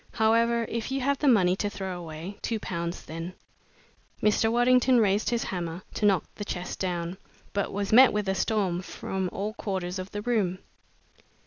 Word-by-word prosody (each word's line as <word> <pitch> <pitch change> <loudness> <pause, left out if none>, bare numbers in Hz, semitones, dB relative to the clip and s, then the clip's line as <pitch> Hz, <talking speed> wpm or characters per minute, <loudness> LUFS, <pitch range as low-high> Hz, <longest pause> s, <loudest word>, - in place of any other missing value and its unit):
"However, 230 +1 +3
if 230 +2 -3
you 270 - 0
have 280 +1 +1
the 295 - +1
money 185 -8 +5
to 205 - -1
throw 190 -2 -5
away 170 +4 -7
two 225 -2 -1
pounds, 170 -3 -4
then." 165 +3 -6 0.8
Mr. 215 +1 +3
Waddington 250 +1 +4
raised 205 -1 +2
his 235 -1 0
hammer 175 -1 -4
to 210 - +2
knock 195 -4 +3
the 205 - -6
chest 180 -3 -5
down, 175 -1 -2 0.4
but 200 -1 -1
was 205 +1 -2
met 255 +3 +9
with 210 -1 -1
a 190 - +2
storm 190 -2 0
from 190 0 -4
all 205 +2 -3
quarters 185 -4 -3
of 185 +1 -5
the 205 +1 -5
room. 210 -7 +1
200 Hz, 180 wpm, -27 LUFS, 180-225 Hz, 0.8 s, met